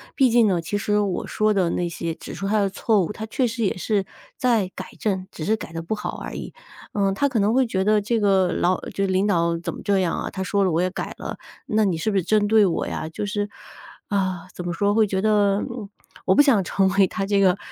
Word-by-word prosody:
毕 265 Hz, -3 st, +4 dB
竟 235 Hz, -1 st, +5 dB
呢， 185 Hz, -4 st, +2 dB
其 165 Hz, +5 st, -4 dB
实 210 Hz, 0 st, +1 dB
我 200 Hz, -3 st, -1 dB
说 215 Hz, 0 st, +1 dB
的 185 Hz, -4 st, +2 dB
那 175 Hz, -, -1 dB
些 170 Hz, -1 st, -4 dB
指 -, -, -9 dB
出 195 Hz, -, -4 dB
他 215 Hz, +1 st, +2 dB
的 200 Hz, -1 st, +2 dB
错 210 Hz, +1 st, +1 dB
误， -, -, -5 dB
他 220 Hz, -, -6 dB
确 255 Hz, +4 st, 0 dB
实 230 Hz, 0 st, -3 dB
也 195 Hz, -, 0 dB
是 200 Hz, +2 st, 0 dB, 0.3 s
在 230 Hz, -7 st, +2 dB
改 185 Hz, -, -6 dB
正， 190 Hz, -3 st, -1 dB
只 155 Hz, -, -6 dB
是 220 Hz, -, +2 dB
改 210 Hz, -, -8 dB
得 165 Hz, 0 st, -4 dB
不 170 Hz, -, -2 dB
好 210 Hz, -, -5 dB
而 -, -, -7 dB
已。 -, -, -6 dB, 0.4 s
嗯， 195 Hz, -1 st, +1 dB
他 280 Hz, +8 st, +1 dB
可 250 Hz, -4 st, 0 dB
能 205 Hz, +2 st, +2 dB
会 260 Hz, +1 st, +3 dB
觉 190 Hz, -4 st, 0 dB
得 210 Hz, +1 st, +3 dB
这 225 Hz, +3 st, 0 dB
个 190 Hz, -3 st, +3 dB
老 180 Hz, +1 st, +1 dB
就 195 Hz, -, -1 dB
领 190 Hz, +1 st, +1 dB
导 170 Hz, -3 st, +1 dB
怎 170 Hz, -, -4 dB
么 -, -, -9 dB
这 200 Hz, -2 st, +2 dB
样 180 Hz, -3 st, 0 dB
啊？ -, -, -3 dB
她 190 Hz, -, -5 dB
说 200 Hz, +1 st, +1 dB
了 185 Hz, -, +2 dB
我 165 Hz, +2 st, +1 dB
也 185 Hz, -, +1 dB
改 185 Hz, -, -5 dB
了， -, -, -5 dB, 0.3 s
那 215 Hz, 0 st, +2 dB
你 185 Hz, -4 st, +1 dB
是 165 Hz, -, -1 dB
不 200 Hz, -, +1 dB
是 190 Hz, -, +1 dB
针 210 Hz, +3 st, +2 dB
对 215 Hz, -1 st, +5 dB
我 175 Hz, -, -1 dB
呀？ -, -, -4 dB
就 160 Hz, +6 st, -5 dB
是 205 Hz, 0 st, -2 dB, 0.6 s
啊， 190 Hz, -3 st, -1 dB
怎 180 Hz, -, -7 dB
么 175 Hz, -, -2 dB
说， 200 Hz, +4 st, +1 dB
会 220 Hz, -1 st, +5 dB
觉 190 Hz, -1 st, -1 dB
得 205 Hz, -1 st, +3 dB, 0.6 s
我 190 Hz, -, +4 dB
不 -, -, +7 dB
想 260 Hz, -9 st, +4 dB
成 195 Hz, +2 st, +1 dB
为 195 Hz, -1 st, +4 dB
他 195 Hz, -, -3 dB
这 200 Hz, 0 st, +2 dB
个 190 Hz, -1 st, +4 dB
200 Hz, 280 characters per minute, -23 LUFS, 185-215 Hz, 0.6 s, 不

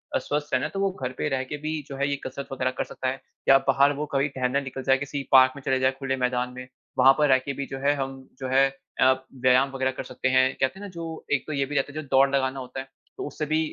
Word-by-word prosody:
अ, -, -, +5 dB
स्वस्थ 150 Hz, 0 st, -3 dB
रहना 130 Hz, -, +2 dB
है -, -, -4 dB
तो 195 Hz, -, -3 dB
वो 195 Hz, 0 st, +1 dB
घर 125 Hz, -, -1 dB
पे -, -, -1 dB
रह 130 Hz, -1 st, -1 dB
के 150 Hz, -, -2 dB
भी 155 Hz, +1 st, -3 dB
जो 140 Hz, -, -6 dB
है 140 Hz, +1 st, 0 dB
ये 140 Hz, -, 0 dB
कसरत 140 Hz, -, -6 dB
वग़ैरह 130 Hz, -1 st, -1 dB
कर -, -, +1 dB
सकता 130 Hz, -, -5 dB
है 135 Hz, -, -5 dB, 0.3 s
या 135 Hz, -, +9 dB
बाहर 140 Hz, +1 st, +4 dB
वो -, -, -1 dB
कभी 140 Hz, +1 st, +2 dB
टहलने 130 Hz, +2 st, +1 dB
निकल 135 Hz, -1 st, -6 dB
जाए 135 Hz, 0 st, +4 dB
किसी 140 Hz, 0 st, -4 dB
पार्क 130 Hz, 0 st, +7 dB
में 140 Hz, -, -9 dB
चले 130 Hz, -1 st, +2 dB
जाएँ 130 Hz, 0 st, +2 dB
खुले 135 Hz, -1 st, -1 dB
मैदान 125 Hz, 0 st, -1 dB
में, 125 Hz, 0 st, -8 dB, 0.3 s
वहाँ 130 Hz, +1 st, +7 dB
पर 150 Hz, -1 st, +4 dB
रह 130 Hz, -, +7 dB
के 140 Hz, -, -2 dB
भी 140 Hz, +1 st, -4 dB
जो 135 Hz, -, -6 dB
है 145 Hz, +1 st, +4 dB
हम 135 Hz, -1 st, -5 dB
जो 130 Hz, -, -4 dB
है 135 Hz, +1 st, +5 dB, 0.3 s
अ, 130 Hz, -, +7 dB, 0.3 s
व्यायाम 130 Hz, +2 st, +4 dB
वग़ैरह 130 Hz, 0 st, +1 dB
कर 130 Hz, -, -6 dB
सकते 130 Hz, -, -2 dB
हैं। 130 Hz, 0 st, +4 dB
कहते 135 Hz, +9 st, 0 dB
हैं -, -, -11 dB
ना -, -, -7 dB
जो 165 Hz, -1 st, -6 dB
एक 145 Hz, -, 0 dB
तो 155 Hz, -, -3 dB
ये 140 Hz, -1 st, 0 dB
भी 145 Hz, -, -6 dB
रहता 140 Hz, +1 st, 0 dB
है 155 Hz, -, -4 dB
जो 150 Hz, -, -13 dB
दौड़ 135 Hz, +1 st, +6 dB
लगाना 135 Hz, 0 st, 0 dB
होता 130 Hz, +1 st, -7 dB
है, 135 Hz, -, -7 dB, 0.3 s
तो -, -, -4 dB
उससे 155 Hz, +1 st, -4 dB
भी 155 Hz, +1 st, +1 dB
135 Hz, 295 wpm, -26 LUFS, 130-145 Hz, 0.3 s, या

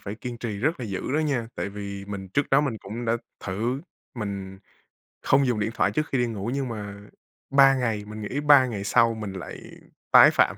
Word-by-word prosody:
phải 100 Hz, +1 st, -6 dB
kiên 120 Hz, +1 st, -7 dB
trì 110 Hz, -4 st, -4 dB
rất 150 Hz, +6 st, 0 dB
là -, -, -3 dB
dữ 95 Hz, -3 st, -3 dB
đó 150 Hz, -, +2 dB
nha, 140 Hz, -7 st, 0 dB
tại -, -, -3 dB
vì 100 Hz, -1 st, -6 dB
mình 100 Hz, -1 st, -6 dB
trước 145 Hz, +9 st, -1 dB
đó 135 Hz, +1 st, +6 dB
mình 135 Hz, -6 st, -1 dB
cũng 110 Hz, +6 st, -6 dB
đã 115 Hz, 0 st, +1 dB, 0.3 s
thử 115 Hz, +8 st, -2 dB, 0.3 s
mình 100 Hz, -4 st, -5 dB, 0.6 s
không 135 Hz, 0 st, +3 dB
dùng 115 Hz, -4 st, 0 dB
điện 105 Hz, -, 0 dB
thoại -, -, +2 dB
trước 155 Hz, 0 st, -1 dB
khi 135 Hz, -, +2 dB
đi 120 Hz, -, +2 dB
ngủ, 110 Hz, -1 st, -4 dB
nhưng 135 Hz, -2 st, -2 dB
mà 105 Hz, -3 st, -6 dB, 0.6 s
3 135 Hz, 0 st, +6 dB
ngày 115 Hz, -5 st, -1 dB
mình 110 Hz, 0 st, -7 dB
nghĩ 130 Hz, +7 st, -3 dB
3 145 Hz, -3 st, +6 dB
ngày 105 Hz, -5 st, -4 dB
sau 115 Hz, +3 st, +3 dB
mình 105 Hz, -3 st, -5 dB
lại 95 Hz, -1 st, -7 dB, 0.5 s
tái -, -, +9 dB
phạm. -, -, +2 dB
115 Hz, 220 wpm, -25 LUFS, 100-130 Hz, 0.6 s, tái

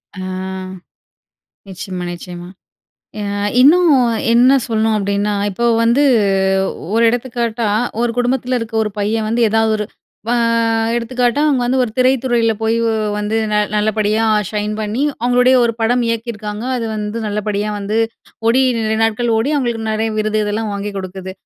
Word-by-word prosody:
ஆ -, -, -8 dB, 1.5 s
நிச்சயமா, 185 Hz, -1 st, -6 dB
நிச்சயமா. 175 Hz, 0 st, -9 dB, 0.7 s
அ -, -, -3 dB, 0.4 s
இன்னும் 335 Hz, +5 st, +6 dB, 0.4 s
என்ன 255 Hz, +3 st, +5 dB
சொல்லணும் 220 Hz, -1 st, +1 dB
அப்பிடின்னா, 200 Hz, +1 st, -1 dB, 0.2 s
இப்போ 235 Hz, +5 st, -3 dB, 0.2 s
வந்து 240 Hz, +5 st, +3 dB, 0.9 s
ஒரு 230 Hz, -, +3 dB
எடுத்துக்காட்டா, 235 Hz, -2 st, -2 dB, 0.3 s
ஒரு 240 Hz, -, +1 dB
குடும்பத்துல 250 Hz, 0 st, 0 dB
இருக்க 225 Hz, 0 st, -7 dB
ஒரு 210 Hz, -, -3 dB
பையன் 215 Hz, +2 st, -1 dB
வந்து, 235 Hz, +1 st, +1 dB
எதா 225 Hz, 0 st, +2 dB
ஒரு 210 Hz, -, -2 dB, 0.4 s
வ -, -, +1 dB, 0.7 s
எடுத்துக்காட்டா 245 Hz, +3 st, 0 dB
அவுங்க 265 Hz, -4 st, +2 dB
வந்து 260 Hz, +2 st, +1 dB
ஒரு 225 Hz, -, -5 dB
திரைத்துறையில 250 Hz, -3 st, +2 dB
போய் 220 Hz, +1 st, +1 dB
வ் 225 Hz, -, +1 dB, 0.2 s
வந்து 210 Hz, +2 st, -1 dB, 0.2 s
ந -, -, +2 dB, 0.2 s
நல்லபடியா 215 Hz, +1 st, +1 dB, 0.3 s
ஷைன் 210 Hz, 0 st, -2 dB
பண்ணி, 215 Hz, +6 st, -2 dB, 0.2 s
அவுங்களுடைய 250 Hz, +1 st, +4 dB
ஒரு 230 Hz, -, +1 dB
படம் 240 Hz, +2 st, +2 dB
இயக்கியிருக்காங்க. 220 Hz, -1 st, -4 dB
அது 230 Hz, -, -3 dB
வந்து 210 Hz, +2 st, -4 dB
நல்லபடியா 210 Hz, 0 st, -2 dB
வந்து 205 Hz, +2 st, -3 dB, 0.5 s
ஓடி, 255 Hz, +3 st, +4 dB, 0.2 s
நிறைய 220 Hz, 0 st, -1 dB
நாட்கள் 230 Hz, +2 st, 0 dB
ஓடி 260 Hz, +7 st, 0 dB
அவுங்களுக்கு 235 Hz, -4 st, -2 dB
நெறைய 220 Hz, +1 st, -1 dB
விருது 215 Hz, 0 st, 0 dB
இதெல்லாம் 210 Hz, +1 st, -2 dB
வாங்கி 200 Hz, +1 st, -4 dB
குடுக்குது. 190 Hz, 0 st, -7 dB
225 Hz, 145 wpm, -17 LUFS, 210-240 Hz, 1.5 s, இன்னும்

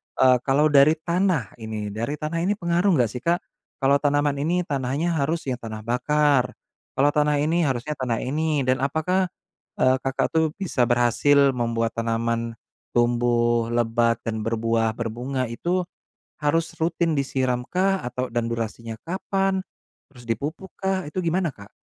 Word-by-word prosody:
eee, 130 Hz, -1 st, +5 dB
kalau 145 Hz, +3 st, +3 dB
dari 145 Hz, +2 st, +6 dB
tanah 170 Hz, -, 0 dB
ini, 110 Hz, -2 st, -5 dB
dari 115 Hz, +7 st, -3 dB
tanah 155 Hz, +2 st, -3 dB
ini 190 Hz, +5 st, +1 dB
pengaruh 175 Hz, 0 st, +2 dB
enggak 120 Hz, -5 st, +2 dB
sih, 125 Hz, -, -5 dB
Kak? 170 Hz, +7 st, 0 dB, 0.4 s
Kalau 140 Hz, +1 st, +4 dB
tanaman 145 Hz, -1 st, +1 dB
ini 175 Hz, +5 st, +1 dB
tanahnya 145 Hz, +3 st, -1 dB
harus 160 Hz, +4 st, 0 dB
yang 125 Hz, -, -3 dB
tanah 110 Hz, -2 st, -7 dB
bakar, 130 Hz, +2 st, +2 dB, 0.4 s
kalau 145 Hz, +2 st, +3 dB
tanah 150 Hz, 0 st, +2 dB
ini 165 Hz, +3 st, +1 dB
harusnya 130 Hz, +2 st, -2 dB
tanah 120 Hz, -3 st, -1 dB
ini, 150 Hz, +1 st, 0 dB
dan 130 Hz, +1 st, +1 dB
apakah, 160 Hz, +7 st, +1 dB, 0.5 s
eee, 130 Hz, 0 st, +5 dB
Kakak 135 Hz, 0 st, 0 dB
tuh 160 Hz, 0 st, +3 dB
bisa 160 Hz, -11 st, 0 dB
berhasil 130 Hz, +4 st, +4 dB
membuat 115 Hz, -2 st, -1 dB
tanaman 115 Hz, 0 st, -1 dB, 0.4 s
tumbuh 120 Hz, -1 st, +2 dB
lebat 115 Hz, 0 st, +2 dB
dan 110 Hz, -1 st, -3 dB
berbuah, 115 Hz, -1 st, 0 dB
berbunga, 120 Hz, +4 st, -3 dB
itu 175 Hz, +9 st, -1 dB, 0.6 s
harus 160 Hz, +2 st, +1 dB
rutin 165 Hz, 0 st, +1 dB
disiramkah 135 Hz, +9 st, 0 dB
atau 125 Hz, +1 st, -3 dB
dan 120 Hz, -1 st, 0 dB
durasinya 115 Hz, 0 st, -4 dB
kapan, 195 Hz, +2 st, -1 dB, 0.5 s
terus 125 Hz, -4 st, -15 dB
dipupukkah, 180 Hz, -, -3 dB
itu 185 Hz, -, -6 dB
gimana, 170 Hz, -1 st, 0 dB
Kak? 100 Hz, +1 st, -14 dB
135 Hz, 145 wpm, -24 LUFS, 120-160 Hz, 0.6 s, dari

